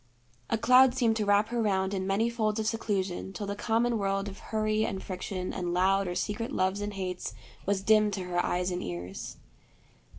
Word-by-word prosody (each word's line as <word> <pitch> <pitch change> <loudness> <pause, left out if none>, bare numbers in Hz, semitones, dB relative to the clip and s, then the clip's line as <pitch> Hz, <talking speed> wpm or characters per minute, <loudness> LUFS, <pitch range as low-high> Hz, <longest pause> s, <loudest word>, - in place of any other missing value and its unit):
A - - +2
cloud 255 +2 +6
seemed 230 -3 +2
to 215 - 0
wrap 205 +2 +4
her 240 0 0
round 190 -2 +1
in 190 -1 -2
many 200 +4 +2
folds 220 -2 0
of 220 - -1
seclusion 195 -4 -2
till 205 +2 -4
the 200 0 -3
common 230 +2 +1
world 195 0 0
of 195 - -8
hurry 215 0 0
and 190 -3 -3
friction 185 0 -4
and 175 -2 -2
loud 195 +1 +3
or 175 - -3
secret 230 +7 -2
loves 190 -3 0
and 205 0 -4
hates 185 -2 -4 0.3
was 195 -1 +1
dim 215 0 +5
to 195 -2 -3
her 175 -1 0
eyes 180 +1 0
and 180 - -2
ears. 90 +2 -6
200 Hz, 200 wpm, -29 LUFS, 185-220 Hz, 0.3 s, cloud